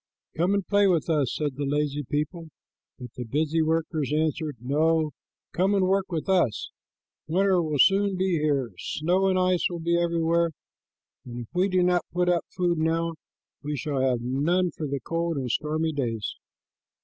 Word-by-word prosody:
"Come 180 +5 +2
and 200 -2 -1
play 205 -1 +3
with 175 -1 +1
us," 145 -5 +1
said 145 -4 -2
the 145 - -2
lazy 145 +1 0
people, 155 +5 -3 0.5
but 125 -2 -10
the 125 - -4
busy 155 +6 0
workers 160 -2 0
answered, 155 -2 -1
"No, 155 +5 +1 0.4
come 190 +3 +2
and 190 -2 +3
work 195 0 +1
with 160 -3 -3
us. 175 - +1 0.6
Winter 185 +2 +3
will 155 -3 -1
soon 195 +5 +4
be 190 +1 +1
here. 140 -6 0
Snow 180 +5 0
and 190 -1 +2
ice 185 -1 +2
will 175 - -4
be 170 +1 +1
everywhere, 170 0 +1 0.7
and 120 0 -7
if 115 - -10
we 185 +2 +2
do 185 -1 +2
not 180 -1 +3
put 180 0 +1
up 175 -2 +1
food 175 -3 0
now 165 +1 0 0.5
we 150 0 -3
shall 140 0 -2
have 130 -3 +1
none 160 +9 +1
for 155 - -4
the 140 0 -2
cold, 165 +4 -2
stormy 155 +3 -1
days." 115 -7 -2
160 Hz, 175 wpm, -26 LUFS, 145-180 Hz, 0.7 s, soon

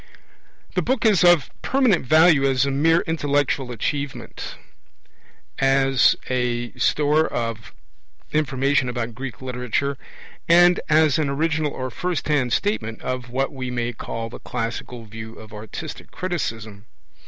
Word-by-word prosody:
The - - +1
book 255 -2 0
is 210 -5 +5
of 175 -6 +5
permanent 255 -10 +2
value 155 -1 +6
as 135 -1 +2
a 140 - -1
mere 165 +5 +3
intellectual 145 -5 0
achievement; 140 +4 -4 1.0
as 135 -1 +4
a 120 -2 -1
store 150 +4 +2
of 115 -2 -4 0.6
information 135 -3 +1
about 120 -1 -3
Greek 130 -1 -7
literature; 125 +2 -2 0.5
and 175 +1 +6
as 155 -1 +4
an 150 -3 0
original 150 +1 0
or 130 -1 -5
first 175 +3 -3
hand 135 -5 +1
statement 115 - -1
of 125 -1 -4
what 135 +4 -1
we 130 -2 -5
may 120 -1 -2
call 115 +1 -5
the - - -9
classical 115 0 -5
view 110 +1 -9
of 110 0 -13
artistic 105 0 -8
criticism. 115 - -4
135 Hz, 130 wpm, -22 LUFS, 120-155 Hz, 1.0 s, value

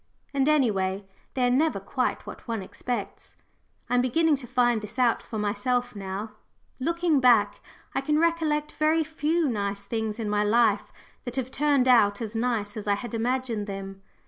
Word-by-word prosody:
And 275 +1 +2
any 280 -7 +4
way, 190 0 -2 0.3
they 255 -2 +2
are - - +3
never 310 +5 +2
quite - - -2
what - - -10
one 225 -4 -2
expects. 220 +1 -6 0.5
I 245 - -3
am 245 - +4
beginning 310 +5 +2
to 255 -2 -9
find 240 -2 +2
this 215 +4 -7
out 245 -2 +3
for 220 - -7
myself 245 +4 -1
now 200 +2 -5 0.5
looking 335 +1 +1
back, 235 -5 +4 0.3
I - - 0
can 300 +2 +1
recollect 315 -2 +1
very 315 +1 +2
few 315 +1 0
nice 200 -4 -2
things 220 -2 -3
in 225 -2 -3
my 210 0 +1
life 215 -1 +2 0.3
that 245 -1 -6
have 260 -1 -2
turned 285 -3 +2
out 205 -5 +5
as 225 -1 -5
nice 225 -3 -1
as 210 -1 -6
I 200 - +3
had 240 +3 -7
imagined 235 -2 -1
them. 195 -1 -7
240 Hz, 180 wpm, -26 LUFS, 210-275 Hz, 0.5 s, out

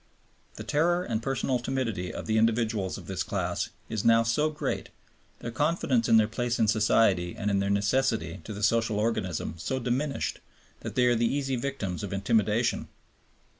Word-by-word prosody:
The - - -7
terror 175 +4 +1
and 115 -8 -2
personal 130 0 -1
timidity 115 -8 -2
of - - -6
the 110 0 +2
individuals 110 -4 +1
of - - -10
this - - -3
class - - -2 0.2
is 110 -2 -3
now 115 0 +5
so 115 +7 +1
great, 155 - -3 0.5
their 115 - -4
confidence 140 -4 +1
in 115 - +7
their 110 -1 +4
place 120 +2 -2
in 110 - +2
society 105 -5 +3
and 105 0 -1
in 100 - +2
their 100 0 0
necessity 100 -4 0
to - - -7
the 105 0 -5
social 115 0 +2
organism 105 -6 -1
so 130 +11 -2
diminished, 130 +4 -2 0.4
that - - -7
they 125 - +4
are 120 -1 +4
the 115 0 +1
easy 135 -1 -1
victims 120 -8 -3
of 100 -3 -5
intimidation. 110 +3 +1
115 Hz, 175 wpm, -28 LUFS, 105-130 Hz, 0.5 s, in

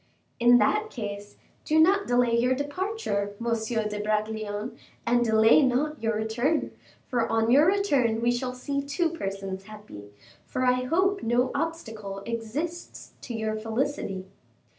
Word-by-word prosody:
"In 240 0 +7
that 425 - +2
case, 205 - -6 0.3
do 310 +1 +2
not 390 +5 +4
delay 245 -1 +3
your 250 +2 +2
departure, 285 - -2
Monsieur 230 -1 -1
de 210 0 -4
Bragelonne, 215 +1 -2 0.3
and 240 0 +3
delay 220 +3 +5
not 285 +3 0
your 225 -1 0
return, 235 +8 0 0.3
for 240 -3 0
on 225 +1 +2
your 290 +5 +6
return 285 - +2
we 235 +1 +2
shall 250 +1 -2
see 280 +2 -2
two 290 +5 0
persons 195 - -5
happy; 210 - -11 0.4
for 255 - -1
I 250 0 +2
hope 380 +7 +1
no 245 +2 +1
obstacle 225 -11 -4
exists 240 +10 -5
to 240 - -6
your 220 -1 -2
felicity." 220 -3 -2
240 Hz, 140 wpm, -27 LUFS, 215-285 Hz, 0.4 s, In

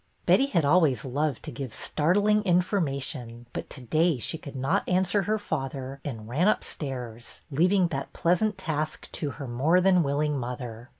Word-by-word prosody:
Betty 275 - +5
had 170 - +1
always 145 - +3
loved 140 +1 -1
to 155 - -6
give 135 -6 -6
startling 205 +7 +2
in 180 -3 +4
formation, 135 - -3
but - - -5
to - - -8
day 155 +5 +2
she 155 +7 -3
could 140 -3 -9
not 135 +1 0
answer 190 +2 +2
her 215 +3 0
father, 135 -7 -4
and 115 -7 -6
ran 150 - +1
upstairs, 125 - -3
leaving 180 +5 +3
that 135 -3 -4
pleasant 190 +5 +1
task 155 -1 -3
to 150 - -3
her 140 - -6
more 140 +9 +3
than 185 -1 +4
willing 145 0 0
mother. 120 -1 -6
150 Hz, 170 wpm, -27 LUFS, 130-180 Hz, -, Betty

